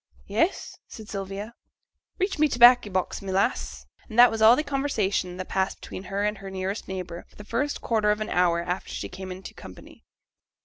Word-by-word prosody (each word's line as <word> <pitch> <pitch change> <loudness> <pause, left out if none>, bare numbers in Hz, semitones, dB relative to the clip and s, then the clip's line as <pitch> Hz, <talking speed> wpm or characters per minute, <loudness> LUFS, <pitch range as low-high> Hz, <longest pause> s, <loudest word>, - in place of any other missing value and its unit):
'Yes,' 230 - -1
said 220 -1 -11
Sylvia. 200 +2 -5 0.6
'Reach 380 -4 -1
me 305 - +5
t' 250 - -3
baccy 240 -2 +7
box, 185 -1 -2
my 195 -1 -5
lass.' 65 - -1 0.2
And 220 - -7
that 245 0 +8
was 225 0 -3
all 220 +2 +8
the 300 - -1
conversation 220 -11 -1
that 185 - -5
passed 190 0 -1
between 190 - -8
her 195 +2 -2
and 210 -1 -1
her 195 0 -8
nearest 190 +2 -4
neighbour 180 -2 -6
for - - -25
the 210 - -11
first 260 +7 -2
quarter 215 -2 +1
of 210 0 +2
an 215 - -4
hour 175 -1 +2
after 180 +2 -4
she - - -5
came 190 -1 -8
into 185 +1 -9
company. - - -13
200 Hz, 205 wpm, -26 LUFS, 185-230 Hz, 0.6 s, that